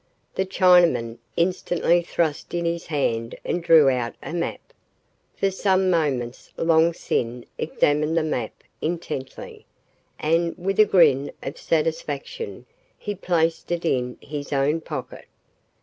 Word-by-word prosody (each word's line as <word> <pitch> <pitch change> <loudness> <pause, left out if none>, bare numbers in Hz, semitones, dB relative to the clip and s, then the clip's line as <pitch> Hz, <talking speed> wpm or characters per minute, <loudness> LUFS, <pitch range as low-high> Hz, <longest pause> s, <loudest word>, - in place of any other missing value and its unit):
The 190 - -1
Chinaman 175 -11 +4 0.2
instantly 175 0 +2
thrust 165 -2 -2
in 170 0 -1
his 170 0 -2
hand 115 -7 -1
and 175 - -1
drew 165 -4 +6
out 125 -3 0
a - - -6
map. 170 -1 -4 0.6
For 195 - 0
some 190 -1 +2
moments 135 -8 -1
Long 165 0 +4
Sin 120 -6 -2
examined 150 +1 +1
the 165 - +3
map 125 -8 -3 0.2
intently, 155 -5 -5 0.5
and, 165 +2 0
with 195 +3 -2
a 215 - +8
grin 145 -8 +4
of 140 - -6
satisfaction, 160 - -2 0.3
he 205 - -4
placed 170 -4 0
it 170 0 -1
in 125 -5 0
his 145 0 -6
own 145 +3 +1
pocket. - - -7
165 Hz, 130 wpm, -24 LUFS, 140-175 Hz, 0.6 s, a